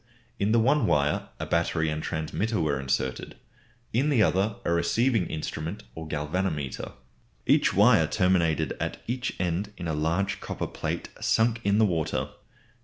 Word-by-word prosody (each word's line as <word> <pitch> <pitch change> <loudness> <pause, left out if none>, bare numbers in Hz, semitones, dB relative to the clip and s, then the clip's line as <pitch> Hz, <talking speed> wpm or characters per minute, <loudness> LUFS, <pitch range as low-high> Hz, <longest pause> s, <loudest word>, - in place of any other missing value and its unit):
In 100 +2 +1
the 115 - +4
one 130 +2 +3
wire 75 0 +1
a - - -3
battery 85 -1 +1
and 75 0 -3
transmitter 95 +9 -2
were 75 -3 0
inserted, 65 -1 -2 0.6
in 135 +7 +2
the 125 -7 +4
other 100 +3 +1
a 85 - +2
receiving 115 +4 +2
instrument 80 +4 -5
or 80 +2 -7
galvanometer. 75 -2 -2 0.5
Each - - +4
wire - - +5
terminated 85 -4 +2
at - - -4
each 125 +1 -3
end 90 +3 -1
in 85 - -5
a 80 - -1
large 85 +6 0
copper - - -4
plate - - -4
sunk 115 0 +2
in 100 +1 +2
the 110 - +5
water. 85 -6 -1
90 Hz, 155 wpm, -27 LUFS, 80-110 Hz, 0.6 s, wire